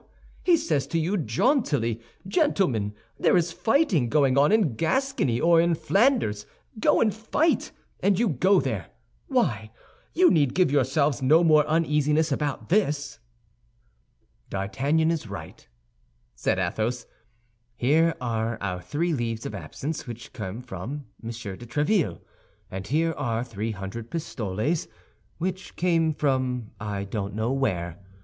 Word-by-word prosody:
He 350 -2 +5
says 150 - -1
to 165 - 0
you 170 +6 0
jauntily, 145 - +1 0.3
'Gentlemen, 160 - +1 0.2
there - - +4
is 170 0 +1
fighting 210 - +2
going 140 -2 +3
on 140 +4 +4
in 210 - +3
Gascony 165 - 0
or 165 0 +5
in 170 0 +2
Flanders; 195 - +1 0.3
go - - +3
and 215 -3 +3
fight,' 225 +9 0 0.3
and 200 -2 +2
you 235 - +2
go 185 +5 +3
there. 110 -10 -2 0.4
Why? 110 -1 0 0.5
You 360 +2 +6
need 145 -6 +2
give 180 -6 +3
yourselves 140 +1 +2
no 155 +6 +5
more 155 -2 +5
uneasiness 155 -1 +2
about 145 -2 -2
this." 145 - 0 1.3
"D'Artagnan 140 +12 0
is 160 -8 -3
right," 100 - -9 0.7
said - - 0
Athos; 115 +2 -1 0.7
"here 155 +7 +3
are 115 -1 -2
our 90 -2 -3
three 160 - -1
leaves 115 -4 -2
of - - -4
absence 130 - -5
which 120 0 -8
came 110 0 -6
from 125 +7 -6 0.2
Monsieur 115 -4 -6
de 120 +4 -11
Tréville, 150 - 0 0.5
and 95 +1 -6
here 165 +4 +1
are 120 -4 -1
three 115 -2 -4
hundred 105 +3 -6
pistoles 135 - -2 0.5
which 185 +2 -4
came 165 -3 +2
from 130 -6 -1
I 105 -2 -3
don't 100 0 -4
know 110 +3 0
where. 90 -10 -1
140 Hz, 135 wpm, -26 LUFS, 115-165 Hz, 1.3 s, You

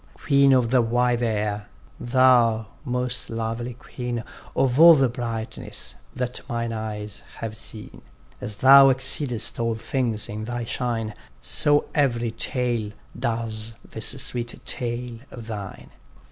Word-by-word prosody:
Queen 140 -1 +3
of 125 -3 +3
the 130 -1 +4
wide 120 +1 +1
air; 105 -2 -2 0.3
thou 120 -3 +3 0.2
most 125 -1 -2
lovely 115 +2 -4
queen 120 -1 -5 0.3
Of 130 0 +1
all 165 0 +10
the 135 -3 +3
brightness 115 - -5 0.2
that 125 -1 -3
mine 115 -1 -2
eyes 105 -1 -6 0.2
have 110 -1 -5
seen! 110 0 -9 0.4
As 105 - -4
thou 135 +1 +8
exceedest 130 -3 +1
all 115 -1 0
things 115 -1 -2
in 105 +1 -6
thy 120 0 -4
shine, 115 -2 -2 0.3
So 145 - +5
every 120 -5 +1
tale, 120 -3 -2 0.2
does 115 -1 -3
this 110 - +1 0.2
sweet 120 -1 -4
tale 120 -1 -4
of 120 -3 -10
thine. 105 -4 -8
120 Hz, 130 wpm, -24 LUFS, 110-125 Hz, 0.4 s, all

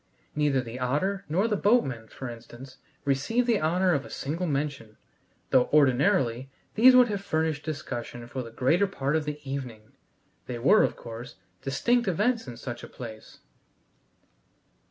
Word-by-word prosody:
Neither 145 -3 +2
the 120 0 -7
otter 185 +11 -1
nor 185 +8 +2
the 215 - +1
boatman, 180 - +1
for 130 - -8
instance, 120 +3 -10 0.3
received 140 - +1
the 230 -4 +2
honor 180 +3 +2
of 140 -3 0
a - - -11
single 165 +6 -3
mention, 140 -7 -3 0.5
though 130 -1 +4
ordinarily 130 -3 +3 0.2
these 250 +4 +7
would 250 -1 +7
have 200 -2 -2
furnished 160 -4 -1
discussion 120 -6 -5
for 130 +2 -5
the 115 - -8
greater 145 - +2
part 145 -6 -2
of 155 -1 0
the 150 0 -4
evening. 125 -6 -6 0.6
They 125 - -4
were, 170 - +5
of - - +1
course, 115 +1 -9 0.3
distinct 235 - +1
events 215 - +1
in 120 -2 -8
such 120 -1 -7
a - - -7
place. 110 -3 -10
140 Hz, 155 wpm, -27 LUFS, 125-185 Hz, 0.6 s, these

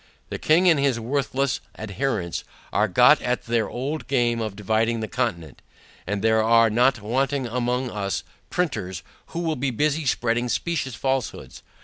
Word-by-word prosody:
The - - -5
king 170 +4 +4
and 165 -5 +5
his 135 -4 +1
worthless 135 +1 -1 0.2
adherents 105 -4 -2 0.3
are 105 - +3
got 125 +9 +5
at 125 0 -1
their 115 -1 0
old 140 +5 -4
game 120 -3 +1
of 110 -3 -3
dividing 110 +3 0
the 110 - -3
Continent, 85 - -3 0.5
and 105 +1 -2
there 110 0 +4
are 115 0 +4
not 120 0 +2
wanting 135 +4 0
among 125 +1 -1
us, 100 -2 -2 0.3
Printers, 100 - -2 0.2
who 170 - -4
will 165 -2 0
be 135 +1 -1
busy 150 +4 0
spreading 120 0 +1
specious 145 -4 -2
falsehoods. 135 -2 -3
120 Hz, 155 wpm, -24 LUFS, 110-135 Hz, 0.5 s, and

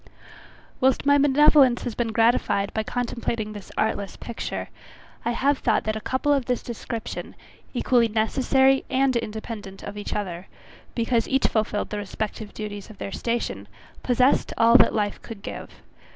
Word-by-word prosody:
Whilst 265 +1 +2
my 285 0 +5
benevolence 280 -2 +5
has 245 - -3
been 230 0 -1
gratified 225 -3 +2
by 220 - 0
contemplating 235 -2 -3
this 205 -2 -10
artless 205 -2 -1
picture, 235 - -5 0.5
I - - 0
have 275 +3 +1
thought - - +1
that 215 0 -1
a 220 - -4
couple 260 +5 +1
of 275 -3 +1
this 250 0 -1
description, 230 -1 -6 0.4
equally 245 -1 +3
necessary 265 +5 +2
and 260 0 +2
independent 220 -3 -5
of 205 0 -7
each 205 - -4
other, 185 -3 -4 0.5
because 230 -1 +1
each 270 0 +1
fulfilled 215 -1 0
the 210 - -2
respective 210 +1 -5
duties 205 -1 -7
of 215 - -12
their 195 - -5
station, 100 - -3 0.3
possessed 250 +2 +2
all 230 +1 +5
that - - +4
life 205 -2 -1
could 220 -4 -10
give. - - -7
230 Hz, 155 wpm, -24 LUFS, 210-255 Hz, 0.5 s, my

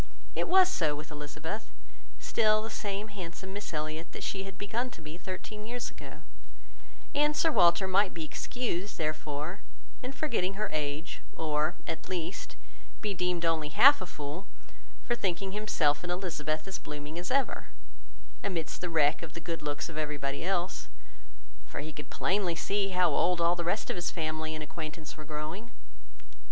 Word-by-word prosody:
It - - +1
was 375 0 +8
so 160 - +2
with 150 +2 -7
Elizabeth, 155 +7 -4 0.5
still 215 -1 +3
the 225 - -4
same 205 0 -2
handsome 190 -1 -6
Miss 205 +1 -4
Elliot 155 +1 -3
that - - -5
she 195 -1 -2
had 195 -1 -8
begun 235 +5 -1
to 235 - -12
be 155 0 -7
thirteen 190 +4 -6
years 245 +1 -3
ago, - - -10 0.9
and 295 +1 +4
Sir 325 - +5
Walter 190 - +6
might 195 +1 +4
be 165 -2 -4
excused, 205 0 -2
therefore, 155 +2 -2 0.4
in 255 - -3
forgetting 235 -10 0
her 210 0 -1
age, 150 +1 -2
or, 155 0 +1
at 165 - -4
least, 175 -1 -3 0.5
be 210 -2 0
deemed 180 -2 +1
only 160 -2 +2
half 280 - +8
a 185 - -3
fool, 150 +6 -5 0.6
for 240 - +2
thinking 195 -4 0
himself 160 -8 +2
and 175 - -2
Elizabeth 155 -4 -1
as 190 - -3
blooming 150 +2 -5
as 180 - -3
ever, 275 +1 +2 0.8
amidst 170 -5 -2
the 180 - -1
wreck 155 -2 +4
of 165 -2 -7
the - - -5
good 165 0 -3
looks 145 -1 -2
of 160 -2 -4
everybody 145 -2 -1
else; 180 0 0 0.8
for - - -5
he 155 +1 -6
could 150 +1 -7
plainly 185 -2 +2
see 195 +3 +1
how 180 -3 +4
old 175 +4 +3
all 170 +1 +5
the 170 - -2
rest 200 +5 +1
of - - -2
his 175 -1 0
family 155 -1 -2
and 155 - -3
acquaintance 155 +1 -6
were 155 - -8
growing. 155 +9 -4
175 Hz, 170 wpm, -31 LUFS, 155-200 Hz, 0.9 s, was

